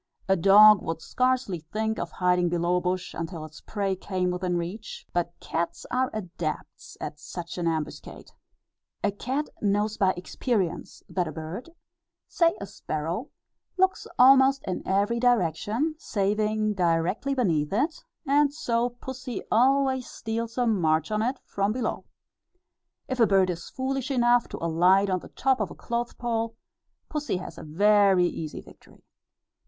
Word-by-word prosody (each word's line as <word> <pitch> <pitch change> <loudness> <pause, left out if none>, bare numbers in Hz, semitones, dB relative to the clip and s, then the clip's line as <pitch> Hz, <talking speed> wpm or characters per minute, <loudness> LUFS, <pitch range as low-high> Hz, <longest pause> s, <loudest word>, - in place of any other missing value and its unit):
A 190 - +4
dog 200 +3 +7
would 165 0 -3
scarcely 255 0 0
think 215 +8 -3
of 175 - -3
hiding 180 0 +1
below 175 +1 +1
a - - 0
bush 180 0 -2
until 165 -1 -5
its 155 0 -13
prey 200 -3 -2
came 185 -1 -2
within 180 0 -1
reach; 180 +6 -6
but 175 0 -2
cats 170 +1 -3
are 255 +1 +1
adepts 175 -6 -6
at 150 - -6 0.4
an 170 - -1
ambuscade. 160 -2 -4 0.7
A 205 - +2
cat 260 +8 -3
knows 210 +1 +1
by 190 -1 +3
experience 180 -1 -2
that 180 -3 -1
a - - -4
bird 160 - -7 0.6
say 335 -1 +2
a 200 - -5
sparrow 170 - -4 0.5
looks 380 0 +1
almost 270 +1 +6
in 185 - -2
every 205 +5 +1
direction, 235 - +1
saving 215 0 0
directly 180 +8 0
beneath 165 - +1
it, 265 - -1 0.2
and 285 0 +3
so 240 -4 0
pussy 250 -1 -7
always 260 +1 +3
steals 230 +1 -4
a 245 - +2
march 160 -6 +1
on 215 0 +1
it, 250 +4 0
from 200 +1 -1
below. 235 0 -3 1.0
If 260 -1 -3
a 230 - +6
bird 190 -2 +3
is 170 -1 -7
foolish 265 0 -3
enough 240 -2 +3
to - - -6
alight 180 +4 +4
on 185 - +1
the - - -13
top 265 -1 +1
of - - -1
a - - -10
clothes 235 0 -3
pole, 230 -1 -2 0.5
pussy 295 - -2
has 185 - -8
a - - -8
very 195 +3 +4
easy 160 -3 -4
victory. - - -19
205 Hz, 150 wpm, -26 LUFS, 175-245 Hz, 1.0 s, dog